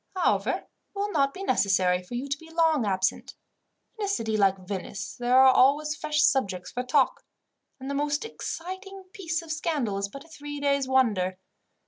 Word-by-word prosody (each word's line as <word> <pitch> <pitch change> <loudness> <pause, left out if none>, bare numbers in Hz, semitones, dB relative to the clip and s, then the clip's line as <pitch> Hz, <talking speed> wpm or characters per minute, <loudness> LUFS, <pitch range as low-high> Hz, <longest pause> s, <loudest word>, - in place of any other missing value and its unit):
However, 215 - +2
it - - -25 0.3
will 405 +1 -2
not 275 -5 +2
be 385 - -8
necessary 190 - +2
for 180 +7 -8
you 255 +3 -3
to 280 +1 -2
be 325 - -14
long 325 -7 +2
absent. 190 -1 -1 0.6
In 415 - 0
a - - -3
city 225 - -1
like 195 -2 +3
Venice 195 0 -5
there 245 +1 +2
are 265 0 +7
always 300 +4 +3
fresh 300 0 0
subjects 190 -9 +1
for 250 - -2
talk, 255 +2 +1 0.6
and 265 - -7
the 280 - -2
most 290 +5 -1
exciting 385 -1 -7
piece 330 -3 -3
of 325 - -7
scandal 295 - -1
is 200 0 -2
but 275 +8 -10
a - - -18
three 290 -2 -8
days' 280 -1 +1
wonder. 210 -9 +2
275 Hz, 185 wpm, -27 LUFS, 210-320 Hz, 0.6 s, are